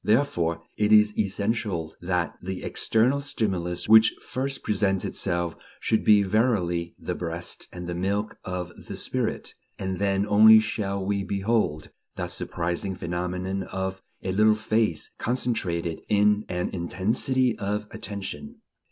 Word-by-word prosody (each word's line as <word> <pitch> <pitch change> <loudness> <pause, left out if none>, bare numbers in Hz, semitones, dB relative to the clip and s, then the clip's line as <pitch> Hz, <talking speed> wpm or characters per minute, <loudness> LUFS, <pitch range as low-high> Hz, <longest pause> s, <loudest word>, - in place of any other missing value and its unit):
Therefore 85 - +1
it 105 0 +2
is 105 -1 +6
essential 100 -5 -1
that 90 -1 -1
the 95 +1 -5
external 125 +6 +2
stimulus 95 -10 -1
which 110 +1 +7
first 135 +2 -4
presents 95 -2 +1
itself 85 -3 -1 0.2
should 110 - +1
be 105 -1 +6
verily 95 -5 +1
the - - -4
breast 85 0 -5
and 90 0 -7
the 90 - -3
milk 100 +4 -2
of 90 -1 -4 0.2
the - - -6
spirit, - - -2 0.2
and 95 -1 -3
then 100 0 +1
only 110 +1 +8
shall 100 -3 -2
we 100 0 0
behold 95 -5 -1 0.2
that - - -4
surprising 90 +3 -2
phenomenon 90 +2 -3
of 95 0 -4 0.2
a 95 - -1
little 105 +3 +4
face 110 -5 0
concentrated 90 -10 -1
in 105 0 +3
an 90 -1 -1
intensity 110 +8 +1
of 105 +1 -2
attention. 110 - -6
100 Hz, 135 wpm, -26 LUFS, 90-110 Hz, 0.2 s, only